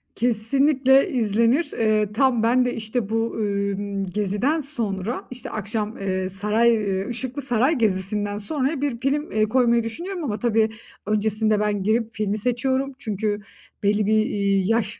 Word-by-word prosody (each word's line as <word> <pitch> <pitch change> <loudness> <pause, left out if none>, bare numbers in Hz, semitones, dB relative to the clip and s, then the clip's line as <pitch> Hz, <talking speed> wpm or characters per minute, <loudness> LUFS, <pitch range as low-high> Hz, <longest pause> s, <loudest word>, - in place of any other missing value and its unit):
Kesinlikle 265 +4 +3
izlenir. 235 +6 +1
Eee, 215 -2 +2
tam 245 -1 +2
ben 250 +2 +3
de 245 - -1
işte 220 -1 -3
bu, 225 +1 -1
ımm, 200 -1 -2
geziden 210 - 0
sonra, 230 -6 -3
işte 250 +1 -6
akşam, 215 +1 -2
eee, 190 -1 -2
saray, 210 +5 +2 0.4
Işıklı 255 +3 -4
Saray 255 +4 +2
Gezisi'nden 205 -1 0
sonraya 270 +7 -1
bir 280 -5 -1
film, 285 +4 -1
eee, 215 0 +2
koymayı 235 +1 +2
düşünüyorum 345 - -5
ama 215 -7 -3
tabii 225 -2 +2 0.4
öncesinde 215 0 +1
ben 210 -2 0
girip 225 +2 +1
filmi 210 -1 -1
seçiyorum. 260 +4 -1
Çünkü 210 -3 -2 0.4
belli 205 +1 +2
bir, 215 - +2
iii, 200 -2 0
yaş 225 -1 0
220 Hz, 145 wpm, -23 LUFS, 205-255 Hz, 0.4 s, Kesinlikle